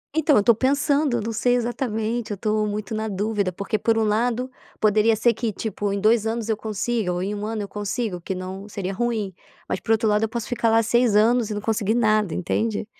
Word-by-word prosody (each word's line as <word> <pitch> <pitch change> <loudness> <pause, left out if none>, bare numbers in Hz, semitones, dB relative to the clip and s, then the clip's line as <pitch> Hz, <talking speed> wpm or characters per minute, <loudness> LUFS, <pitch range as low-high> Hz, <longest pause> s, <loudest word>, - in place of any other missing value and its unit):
Então, 310 -4 +4
eu 205 - +4
tô 235 - +6
pensando, 280 +2 +1
eu - - -2
não 230 - -3
sei 245 +3 +2
exatamente, 235 -2 -2
eu 200 - -3
tô 215 0 0
muito 210 +1 -4
na 220 0 -2
dúvida. 205 -1 -1
Porque 200 +4 -3
por 225 +2 +2
um 225 - +2
lado, 235 +4 0 0.3
poderia 215 +1 +3
ser 235 +2 +3
que 230 -3 -2
tipo 205 0 -3
em 200 - -1
2 220 +1 +3
anos 225 0 -2
eu 220 - +2
consiga, 215 -1 -2
ou 180 +1 -2
em 205 +2 -2
1 205 0 -5
ano 220 -1 -3
eu 200 - -6
consigo, 205 -2 -3
que 190 - -4
não 190 +2 -7
seria 195 -1 -4
ruim, 220 -3 -2 0.3
mas - - -2
por - - -3
outro 220 0 +1
lado 210 0 +2
eu 225 - 0
posso 235 0 -4
ficar 235 -2 0
lá 225 0 +4
6 235 -1 +2
anos 225 +1 +3
e 210 - -3
não 205 - -3
consegui 220 0 0
nada, 215 -5 +2
entende? 215 +4 -1
220 Hz, 235 wpm, -23 LUFS, 205-235 Hz, 0.3 s, tô